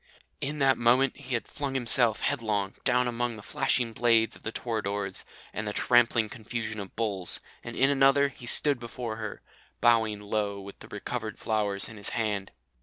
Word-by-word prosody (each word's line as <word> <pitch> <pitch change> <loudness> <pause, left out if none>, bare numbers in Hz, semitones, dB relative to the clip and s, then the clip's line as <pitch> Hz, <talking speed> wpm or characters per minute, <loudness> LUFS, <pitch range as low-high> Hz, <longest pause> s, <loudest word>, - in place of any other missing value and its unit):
"In 150 +2 -3
a 135 -1 +6
moment 125 +2 +3
he 125 0 -4
had 115 - -3
flung 140 -2 -4
himself 120 -2 +4
headlong 105 -7 -1
down 125 -1 +3
among 120 0 -2
the 105 - -11
flashing 125 -4 0
blades 115 -1 +3
of - - -15
the 115 - -4
toreadors 100 -5 -3 0.3
and 105 0 -4
the 105 - -2
trampling 120 -2 +3
confusion 110 0 -5
of 100 -2 -8
bulls, 100 -5 -2 0.2
and - - -7
in 135 +2 +4
another 140 +1 +4
he 125 -2 -9
stood 145 +1 +4
before 115 -1 -5
her, 110 -2 -6 0.4
bowing 110 -3 +3
low 105 -1 -2
with 100 0 -10
the - - -12
recovered 110 +2 -5
flowers 105 -3 0
in 115 - -10
his 100 - +1
hand. 105 -3 -1
115 Hz, 180 wpm, -28 LUFS, 105-125 Hz, 0.4 s, a